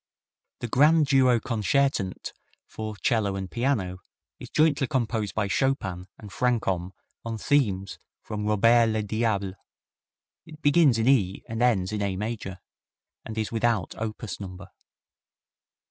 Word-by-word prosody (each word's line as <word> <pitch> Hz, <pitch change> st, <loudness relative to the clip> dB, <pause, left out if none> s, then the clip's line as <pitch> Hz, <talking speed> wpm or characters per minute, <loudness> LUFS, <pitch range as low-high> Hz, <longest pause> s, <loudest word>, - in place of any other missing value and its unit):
The 120 Hz, -, -2 dB
Grand 150 Hz, +6 st, +4 dB
Duo 130 Hz, -3 st, +4 dB
Concertant 115 Hz, -2 st, -1 dB, 0.3 s
for 110 Hz, -1 st, -6 dB
'cello 105 Hz, -3 st, 0 dB
and 95 Hz, -1 st, -5 dB
piano 115 Hz, -8 st, -1 dB, 0.4 s
is -, -, -9 dB
jointly 150 Hz, -3 st, +2 dB
composed 115 Hz, -6 st, -1 dB
by 100 Hz, -2 st, 0 dB
Chopin 95 Hz, -5 st, -1 dB
and 105 Hz, -2 st, -11 dB
Franchomme 95 Hz, -8 st, 0 dB, 0.3 s
on 115 Hz, -1 st, -4 dB
themes 100 Hz, -7 st, 0 dB, 0.2 s
from 105 Hz, 0 st, -4 dB
"Robert 115 Hz, +3 st, +4 dB
le 110 Hz, -1 st, -1 dB
Diable." 105 Hz, -2 st, -1 dB, 0.9 s
It 155 Hz, -2 st, -12 dB
begins 145 Hz, -4 st, +5 dB
in 115 Hz, +1 st, 0 dB
E 100 Hz, -9 st, +2 dB
and 115 Hz, +1 st, -4 dB
ends 105 Hz, -6 st, +2 dB
in 105 Hz, -1 st, -2 dB
A 100 Hz, -2 st, -1 dB
major, 105 Hz, -2 st, -4 dB, 0.7 s
and 110 Hz, 0 st, -7 dB
is 110 Hz, -1 st, -2 dB
without 115 Hz, -5 st, 0 dB
opus 110 Hz, 0 st, -5 dB
number. 95 Hz, -1 st, -9 dB
110 Hz, 130 wpm, -26 LUFS, 100-125 Hz, 0.9 s, begins